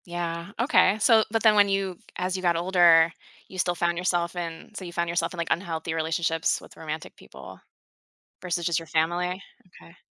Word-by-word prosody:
Yeah, 170 +1 -4
okay, 235 -6 +4
so 220 0 +5
but 225 +1 -1
then 220 -2 +6
when 205 -1 +5
you 195 -2 -1 0.2
as 185 +1 -2
you 185 - -3
got 175 -2 +2
older, 170 -2 +5 0.4
you 185 - -9
still 175 -1 +1
found 170 0 0
yourself 175 -1 -1
in 165 +2 -6
so 205 - -7
you 175 - -7
found 170 0 -1
yourself 170 0 -1
in, - - -9
like, 170 - -3
unhealthy 165 -2 -2
relationships 165 0 0
with - - -15
romantic 155 -1 -7
people - - -13 0.8
versus 175 -2 -3
just 170 -1 +1
your 165 - -7
family? 175 +4 -1 0.4
Okay. 170 - -17
175 Hz, 190 wpm, -26 LUFS, 165-185 Hz, 0.8 s, then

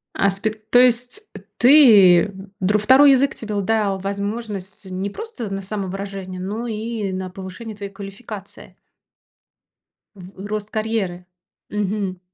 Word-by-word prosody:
Аспект, 215 +3 -1
то 245 - +7
есть 250 - +2 0.3
ты 215 - +7 0.3
др 200 +3 +2
2 265 +6 +6
язык 270 +1 +3
тебе 215 -2 -6
л 205 - 0
дал 200 -1 0
возможность 200 0 -5
не 190 +2 -4
просто 340 - -7
на 195 - -3
самовыражение, 195 -1 -5
но 210 +6 -4
и 220 -2 -3
на 185 0 -4
повышение 190 +4 -8
твоей 200 -1 -7
квалификации. 200 +1 -10 1.4
В 190 +1 -11
рост 210 0 -4
карьеры, 215 -5 -2 0.4
мгм. 200 -2 -2
205 Hz, 120 wpm, -21 LUFS, 195-225 Hz, 1.4 s, то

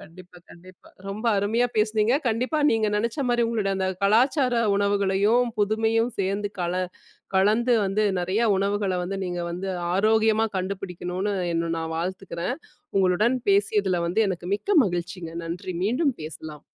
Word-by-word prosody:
கண்டிப்பா, 180 +2 -14
கண்டிப்பா. 180 +1 -16 0.2
ரொம்ப 205 +4 -6
அருமையா 220 +5 +1
பேசினீங்க. 215 +2 +2
கண்டிப்பா 250 +7 0
நீங்க 220 -1 +2
நெனச்ச 230 +5 -1
மாரி, 240 0 +2
உங்களோட 225 -3 -1
அந்தக் 190 -1 -2
கலாச்சார 250 +5 +3 0.2
உணவுகளையும், 200 +3 +2
புதுமையும் 220 +3 +1
சேந்து 200 +1 -1
கல 175 0 -1 0.6
கலந்து 220 +6 +3
வந்து 195 +2 0
நெறய 185 +5 0
உணவுகள 200 -1 0
வந்து 195 +2 -4
நீங்க 175 -1 -3
வந்து, 180 +3 -4 0.3
ஆரோக்கியமா 220 +2 +3
கண்டுபிடிக்கணும்னு 185 +1 -3 0.2
என்ன 165 0 -1
நான் 160 0 -4
வாழ்த்துகுறேன். 180 +3 -3 0.4
உங்களுடன் 195 +7 +3
பேசியதுல 200 -2 +2
வந்து 180 +6 +1
எனக்கு 175 -1 -5
மிக்க 385 - +2
மகிழ்ச்சிங்க. 175 -2 -4
நன்றி. 175 +2 -5
மீண்டும் 255 - +1
பேசலாம். 155 -1 -8
200 Hz, 130 wpm, -25 LUFS, 180-220 Hz, 0.6 s, கலாச்சார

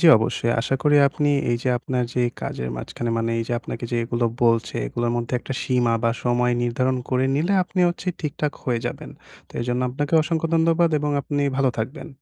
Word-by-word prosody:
জি 170 - +5
অবশ্যই। 115 +1 0
আশা 135 - -1
করি 145 0 +4
আপনি 145 +2 -1 0.2
এই 120 - +2
যে 130 - 0
আপনার 125 0 -2
যে 125 - +1 0.2
কাজের 60 - -4
মাঝখানে 115 - -4
মানে 115 0 -1
এই 115 - -1
যে - - -2
আপনাকে 120 - -6
যে - - +1
এগুলো 120 0 -1 0.2
বলছে 115 -1 +2
এগুলোর 120 - -1
মধ্যে 120 +1 -3
একটা 135 - -6
সীমা 125 -2 +2
বা 115 - +3
সময় 125 0 +2
নির্ধারণ 130 +2 0
করে 130 0 +1
নিলে 165 +7 +1
আপনি 180 +1 -2
হচ্ছে 175 +2 -5
ঠিকঠাক 150 -1 -2
হয়ে 120 -3 0
যাবেন। - - -6 0.4
তো - - -20
এজন্য 125 +1 -1
আপনাকে 145 +4 -3
অসংখ্য 165 0 -1
ধন্যবাদ 165 +1 +3
এবং 150 0 -1
আপনি 145 +1 -2
ভালো 135 -2 +3
থাকবেন। 130 +8 -4
125 Hz, 200 wpm, -23 LUFS, 120-145 Hz, 0.4 s, জি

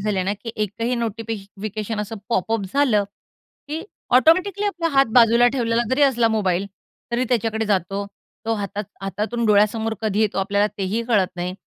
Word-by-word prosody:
झाली 205 -1 -1
आहे 185 - 0
ना, 200 - 0
की 230 +3 -7
एकही 220 +4 -1
नोटिफि 225 -1 -3 0.3
फिकेशन 215 0 -3
असं 210 +2 -5
पॉपअप 225 0 0
झालं 240 -8 +3 0.6
की 315 +3 -4 0.3
ऑटोमॅटिकली 370 +8 +3
आपला 345 -4 -1
हात 270 0 +5
बाजूला 235 0 +6
ठेवलेला 235 -2 +1
जरी 275 +3 +2
असला 240 -4 +4
मोबाईल, 195 -3 0 0.5
तरी 245 +2 +1
त्याच्याकडे 225 -2 0
जातो. 195 0 -1 0.4
तो 225 0 0
हातात 205 0 -4 0.2
हातातून 220 +4 -2
डोळ्यासमोर 215 +2 +2
कधी 215 -1 0
येतो, 210 -2 +1
आपल्याला 200 +1 +2
तेही 200 +4 -1
कळत 200 -6 +3
नाही. 180 +1 -3
220 Hz, 165 wpm, -22 LUFS, 200-235 Hz, 0.6 s, बाजूला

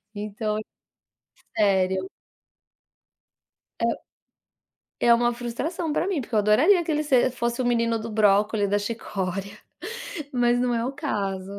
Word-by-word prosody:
Então 210 +1 -3 1.0
sério 190 -2 +2 1.7
É - - +2 1.1
é 235 - +5
uma 240 +1 +3
frustração 275 +8 -3
pra 355 - 0
mim, 360 -8 0
porque 240 - -12
eu 215 - +4
adoraria 285 - +4
que 325 - -2
ele 300 0 0
se 260 -3 +3
fosse 240 0 -2
o - - -1
menino 230 -1 +1
do 230 +1 -6
brócolis, 210 0 +3
da 205 +1 +1
chicória, 200 -3 -4 0.8
mas 245 -1 +2
não 250 -1 +1
é 230 0 0
o 265 - -3
caso. 200 - -3
230 Hz, 135 wpm, -25 LUFS, 205-245 Hz, 1.7 s, é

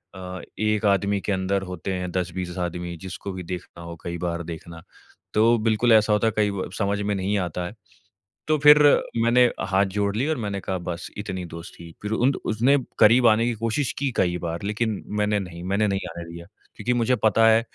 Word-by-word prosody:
अ, 90 -1 -7 0.2
एक 105 0 +1
आदमी 100 0 +2
के 105 - -3
अंदर 95 +1 0
होते 90 +2 -4
हैं 90 -1 -3
10-20 90 0 -3
आदमी 85 0 -5
जिसको 95 +1 -6
भी 90 -1 -6
देखना 85 -1 -8
हो 85 0 -7
कई 85 0 -4
बार 85 0 -2
देखना। 85 0 -8 0.5
तो 115 +2 +4
बिल्कुल 115 +2 +3
ऐसा 110 -1 +5
होता 105 +2 +2
है 110 - 0
कई 105 -1 +2
ब 95 -2 -4
समझ 100 0 0
में 105 0 -1
नहीं 100 +2 0
आता 90 -1 -3
है, 90 - -7 0.7
तो 155 0 +3
फिर 150 +1 +8 0.5
मैंने 120 +2 +5 0.2
हाथ 95 +1 +3
जोड़ 100 0 0
लिए 130 +7 0
और 155 - 0
मैंने 100 -1 -3
कहा 95 - -3
बस 85 -1 -5
इतनी 95 -3 -4
दोस्ती। 85 0 -10
फिर 105 - -4
उन 120 +4 +3
द - - -5
उसने 120 +6 +3 0.2
करीब 120 +3 +6
आने 110 +1 +4
की 120 - 0
कोशिश 115 +4 0
की 140 -1 0
कई 90 -1 +2
बार 85 +2 -4
लेकिन 105 +1 -2 0.2
मैंने 105 0 +1
नहीं 90 -3 -7
मैंने 100 +3 +1
नहीं 95 -1 -2
आने 85 +1 -7
दिया 85 0 -9 0.3
क्योंकि 120 +4 -1
मुझे 120 +1 +2
पता 115 +1 +5
है 110 0 +5
100 Hz, 210 wpm, -24 LUFS, 90-110 Hz, 0.7 s, फिर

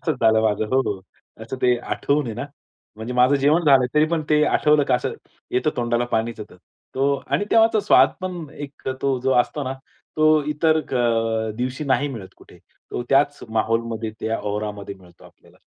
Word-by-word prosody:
असंच 160 -5 -1
झालं 110 -1 +4
माझं 110 0 0 0.4
असं 115 +4 -6
ते 125 -1 +4
आठवून 140 +3 -1
आहे 115 - -5
ना. 120 - -4 0.5
म्हणजे 110 +3 -6
माझं 125 +3 +4
जेवण 150 +5 +2
झालं 135 -4 +5
तरी 150 0 +5
पण 165 -1 -1
ते 150 0 +4
आठवलं 150 -1 +3
का - - +1
असं 125 - -1 0.4
येतं 130 +5 +1
तोंडाला 120 0 0
पाणीचं 115 -2 -2
येत. - - -16 0.4
तो 140 +1 +2
आणि 205 - 0
तेव्हाचा 225 -1 +4
स्वाद 205 - +5
पण 180 -3 -5
एक 140 -2 -8
तो 135 -2 +1
जो 130 +1 +1
असतो 145 +4 -3
ना 130 - -3 0.4
तो 155 0 +4
इतर 155 +1 +2
अ, 115 -5 0
दिवशी 130 +4 -3
नाही 140 +1 +1
मिळत 110 -9 -8
कुठे. - - -18 0.3
तो - - -3
त्याच 145 +1 +3
माहौल 110 +1 +1
मध्ये 110 0 -4
त्या 110 0 -2
औरामध्ये 105 -1 -5
मिळतो 90 -2 -19
आपल्याला. - - -20
130 Hz, 180 wpm, -22 LUFS, 115-150 Hz, 0.5 s, झालं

